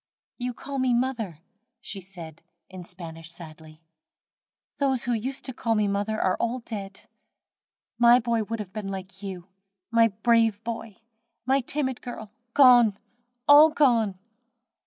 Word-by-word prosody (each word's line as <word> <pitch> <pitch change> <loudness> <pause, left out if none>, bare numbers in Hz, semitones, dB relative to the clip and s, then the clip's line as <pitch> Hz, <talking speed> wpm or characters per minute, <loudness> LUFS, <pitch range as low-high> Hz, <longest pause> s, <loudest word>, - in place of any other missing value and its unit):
"You 245 0 -3
call 275 0 -5
me 255 -2 +2
mother," 230 - -2 0.4
she 200 -4 -8
said, 170 -4 -10 0.3
in 185 -1 -8
Spanish, 165 -2 -9
sadly, 160 -1 -12 0.9
"those 265 -3 +1
who 245 - 0
used 255 +5 -4
to 260 - -4
call 230 -2 -1
me 210 -1 +2
mother 205 +2 -1
are 185 - +1
all 235 +2 -1
dead! 200 -5 -8 1.0
My 240 +1 +7
boy 230 -1 0
would 225 +2 -4
have 200 -3 -7
been 215 -2 -5
like 190 0 -8
you. 190 -3 -7 0.5
My 230 0 +5
brave 225 0 +2
boy! 230 -2 -6 0.4
my 265 +2 +3
timid 260 -1 -2
girl, 220 -4 -8 0.2
gone! 245 -7 +6 0.5
all 295 +2 +9
gone!" 235 -10 +2
225 Hz, 140 wpm, -26 LUFS, 190-245 Hz, 1.0 s, all